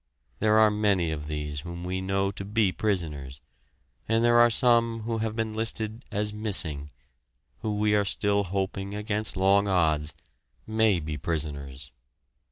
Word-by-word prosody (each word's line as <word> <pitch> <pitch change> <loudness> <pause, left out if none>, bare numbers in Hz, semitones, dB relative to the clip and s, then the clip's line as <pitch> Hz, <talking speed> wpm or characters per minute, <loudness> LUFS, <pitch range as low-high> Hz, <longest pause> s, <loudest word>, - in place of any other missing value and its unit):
There 110 0 +3
are 110 -1 +5
many 100 -6 +1
of 75 -1 -5
these 75 -1 -4
whom 85 +3 -8
we 95 +1 -3
know 95 +1 0
to 100 - -7
be 105 -1 +1
prisoners, 75 -11 -3 0.7
and 115 +1 +2
there 120 0 +5
are 120 0 +7
some 115 -1 +2
who 115 +1 -3
have 110 0 -2
been 110 -1 -2
listed 110 +1 -3
as 105 +1 -1
"missing," 85 -9 +2 0.7
who 105 -1 -3
we 105 0 +2
are 105 -1 +3
still 100 +1 0
hoping 95 +1 -3
against 105 -1 -2
long 100 +2 +3
odds 80 -5 +1 0.5
may 110 -4 +2
be 75 -1 -5
prisoners! 70 -4 -4
100 Hz, 155 wpm, -27 LUFS, 80-110 Hz, 0.7 s, are